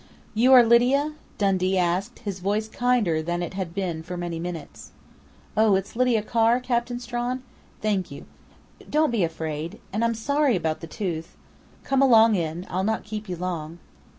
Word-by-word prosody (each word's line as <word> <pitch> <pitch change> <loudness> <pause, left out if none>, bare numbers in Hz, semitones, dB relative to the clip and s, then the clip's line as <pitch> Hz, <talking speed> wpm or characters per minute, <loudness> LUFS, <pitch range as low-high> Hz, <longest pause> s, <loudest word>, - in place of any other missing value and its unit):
"You 240 +5 +4
are 250 -2 +9
Lydia?" 250 +6 +3 0.2
Dundee 190 -2 +1
asked, 185 +6 -1
his 195 -2 -3
voice 205 +4 -1
kinder 220 -9 +1
than 175 +2 -2
it 175 - -5
had 185 -3 -5
been 180 -5 -2
for 180 +2 -6
many 175 -1 -4
minutes. 155 - -7 0.6
"Oh, 215 -2 +4
it's 195 +3 -3
Lydia 245 -3 +2
Carr, 230 +2 +3
Captain 245 -1 -1
Strawn? 245 +1 -3 0.4
Thank 200 -4 0
you.... 140 - -10 0.6
Don't 305 -2 +2
be 225 -6 +1
afraid. 160 +2 -4
And 215 +3 0
I'm 230 0 +1
sorry 280 +2 +1
about 160 -3 -1
the 165 - -8
tooth.... 170 -4 -5 0.5
Come 270 0 +1
along 230 -4 +6
in. 170 -1 -2
I'll 185 +1 -2
not 220 +2 0
keep 210 -1 -6
you 180 - -2
long." 170 -2 -4
200 Hz, 170 wpm, -25 LUFS, 175-235 Hz, 0.6 s, are